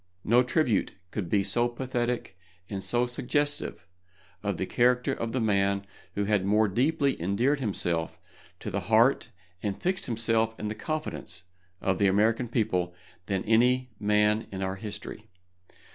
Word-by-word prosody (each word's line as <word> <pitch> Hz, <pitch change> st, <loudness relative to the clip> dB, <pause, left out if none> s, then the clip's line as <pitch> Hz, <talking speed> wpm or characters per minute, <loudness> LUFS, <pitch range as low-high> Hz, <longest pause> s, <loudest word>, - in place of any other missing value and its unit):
No 120 Hz, +3 st, +5 dB
tribute 125 Hz, -3 st, +1 dB, 0.2 s
could 95 Hz, -6 st, -3 dB
be 100 Hz, +1 st, +3 dB
so 120 Hz, +5 st, +3 dB
pathetic 120 Hz, -3 st, -2 dB, 0.3 s
and 95 Hz, -2 st, -4 dB
so 120 Hz, 0 st, +2 dB
suggestive 145 Hz, -, -1 dB, 0.6 s
of 100 Hz, -2 st, -2 dB
the 95 Hz, -, -1 dB
character 125 Hz, +3 st, +2 dB
of 115 Hz, 0 st, -3 dB
the 130 Hz, -, -1 dB
man 100 Hz, -2 st, +1 dB, 0.3 s
who 100 Hz, -, 0 dB
had 105 Hz, -1 st, +2 dB
more 105 Hz, +2 st, +3 dB
deeply 140 Hz, -, +1 dB
endeared 120 Hz, -, +1 dB
himself 85 Hz, -8 st, -1 dB, 0.4 s
to -, -, -4 dB
the -, -, -1 dB
heart 115 Hz, +5 st, +4 dB, 0.3 s
and 100 Hz, -2 st, -3 dB
fixed 185 Hz, +1 st, 0 dB
himself 115 Hz, -1 st, +1 dB
in 105 Hz, -, -3 dB
the -, -, -2 dB
confidence 110 Hz, -, -4 dB, 0.4 s
of 95 Hz, -1 st, 0 dB
the 100 Hz, -, +4 dB
American 110 Hz, +5 st, +2 dB
people 90 Hz, -7 st, 0 dB, 0.3 s
than 95 Hz, -2 st, -1 dB
any 125 Hz, +3 st, +3 dB
man 105 Hz, +1 st, +2 dB
in 95 Hz, 0 st, -4 dB
our 95 Hz, 0 st, -2 dB
history. 105 Hz, +1 st, -7 dB
110 Hz, 150 wpm, -28 LUFS, 100-125 Hz, 0.6 s, No